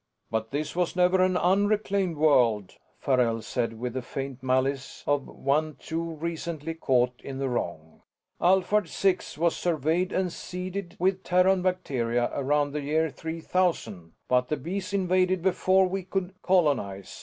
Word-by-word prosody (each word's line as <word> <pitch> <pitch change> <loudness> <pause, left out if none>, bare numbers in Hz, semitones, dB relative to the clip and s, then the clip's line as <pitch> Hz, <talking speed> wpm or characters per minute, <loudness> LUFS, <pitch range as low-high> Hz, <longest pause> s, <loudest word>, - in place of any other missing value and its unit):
"But 110 0 -1
this 150 +4 -3
was 180 0 0
never 180 +1 +4
an 185 0 +3
unreclaimed 200 -1 +1
world," 120 -10 +3 0.2
Farrell 120 -4 +1
said 115 +1 -2
with 125 0 -3
the 130 - -2
faint 135 0 -6
malice 130 +1 -1
of 145 -1 0
one 150 +2 -1
too 165 0 -4
recently 165 -1 -4
caught 125 -5 +1
in 135 -1 -6
the 135 0 -1
wrong. 80 -9 -4 0.4
"Alphard 190 +2 +3
Six 185 -6 0
was 170 +1 +2
surveyed 170 +2 0
and 185 -2 -1
seeded 180 0 -6
with 190 +1 +1
Terran 180 +1 +3
bacteria 125 -10 0
around 145 +1 +1
the 150 +1 -3
year 155 +2 0
3000, 160 - -2
but 125 0 +2
the 150 - -1
Bees 185 +9 -4
invaded 185 -2 +1
before 190 0 +3
we 190 +1 -2
could 185 0 -3
colonize. 140 - 0
160 Hz, 145 wpm, -27 LUFS, 130-185 Hz, 0.4 s, never